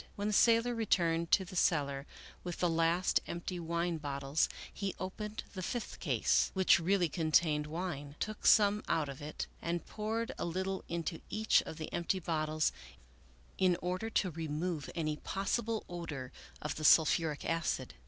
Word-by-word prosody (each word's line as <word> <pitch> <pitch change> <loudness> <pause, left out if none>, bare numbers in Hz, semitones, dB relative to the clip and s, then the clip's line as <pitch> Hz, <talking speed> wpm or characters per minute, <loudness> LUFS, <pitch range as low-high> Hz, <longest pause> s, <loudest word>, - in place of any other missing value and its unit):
When 205 +1 -1
the - - -1
sailor 230 +3 +4
returned 170 -7 +1
to 190 - +5
the 185 - -10
cellar 140 -6 +1 0.4
with 175 -1 -4
the 175 - +2
last 165 +2 +2
empty 175 +1 -4
wine 170 0 -1
bottles, 140 0 0 0.2
he 200 -2 -3
opened 210 +3 -5
the 185 - -5
fifth 235 +5 -4
case, - - +2
which 190 -2 +5
really 180 +1 +2
contained 155 -1 +2
wine, 150 -3 -4
took 215 0 -2
some 205 -1 +6
of 145 -4 -1
it 150 +1 -4
out, - - -23
and 170 0 -2
poured 225 +3 -3
a - - -1
little 190 +3 -2
into 165 0 -3
each 220 +1 +3
of 160 - -6
the 155 - -6
empty 175 +2 0
bottles 155 -2 0 0.9
in 185 -2 +4
order 185 +5 -2
to 190 -4 +1
remove 160 0 -3
any 155 -3 -1
possible 220 +5 -2
odor 150 -7 -6 0.3
of 150 - -3
the 155 - -5
sulphuric 155 -1 +4
acid. 165 -6 -1
170 Hz, 160 wpm, -33 LUFS, 155-190 Hz, 0.9 s, some